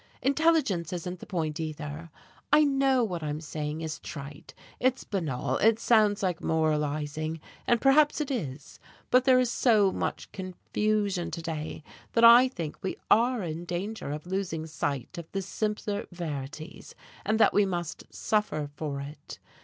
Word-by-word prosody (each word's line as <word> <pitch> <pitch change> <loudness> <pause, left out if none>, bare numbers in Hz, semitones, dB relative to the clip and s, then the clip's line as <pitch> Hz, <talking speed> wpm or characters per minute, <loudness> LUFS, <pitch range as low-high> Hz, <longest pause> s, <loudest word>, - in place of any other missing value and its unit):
Intelligence 275 - +2
isn't 180 0 -4
the - - -10
point, 165 -5 -2
either. 155 0 -5 0.4
I 300 +1 +7
know 270 -3 +3
what 180 -6 -2
I'm 150 0 -3
saying 155 0 -4
is 160 -1 -4
trite, 140 0 -9 0.2
it's 255 +1 +1
banal, 140 - -2
it 225 +1 +4
sounds 215 -4 +3
like 180 -3 0
moralizing, 155 0 0 0.3
and 240 - +4
perhaps 290 +4 +4
it 295 -2 -2
is, 150 - -5 0.3
but 255 0 +5
there 260 -2 +6
is 250 -2 +1
so 215 -6 +4
much - - -3
confusion 195 0 -1
to 165 - -5
day 160 -2 -5 0.3
that 230 - +3
I 235 +2 +9
think 165 - -6
we 190 - -3
are 235 0 +4
in 165 0 -4
danger 175 0 -4
of 150 +2 -5
losing 180 -4 -2
sight 150 0 -3
of 165 - -10
the 195 - -1
simpler 210 +1 -2
verities, 155 -2 -6 0.3
and 215 +2 +1
that - - +5
we 205 -1 +4
must 175 -3 -4
suffer 155 -9 -1
for 145 -3 -4
it. 145 +1 -9
175 Hz, 155 wpm, -28 LUFS, 155-220 Hz, 0.4 s, I